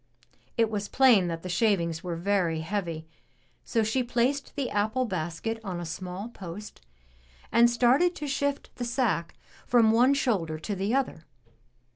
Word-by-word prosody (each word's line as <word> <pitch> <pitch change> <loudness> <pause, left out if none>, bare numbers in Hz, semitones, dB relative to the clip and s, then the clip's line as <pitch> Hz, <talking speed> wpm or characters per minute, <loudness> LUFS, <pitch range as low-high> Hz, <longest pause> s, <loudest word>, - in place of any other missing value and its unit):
It 225 -1 +2
was 205 -1 -2
plain 240 -9 +5
that 165 -1 -4
the - - -5
shavings 170 -3 +1
were 175 -2 -3
very 170 -3 0
heavy, 165 -3 -3 0.6
so 225 -2 0
she 220 +5 +1
placed 250 +3 -1
the 275 -4 -2
apple 215 +5 +1
basket 185 +3 -3
on 185 -4 -4
a 175 - -5
small 180 +5 -6
post 195 - -9 0.7
and 235 +1 +6
started 255 +9 +3
to 300 - -5
shift 285 0 -2
the 245 - -3
sack 235 - -1 0.3
from 230 -3 +5
one 250 +5 +4
shoulder 195 - 0
to 180 +7 -4
the 200 +6 0
other. 255 - -2
210 Hz, 155 wpm, -27 LUFS, 175-245 Hz, 0.7 s, and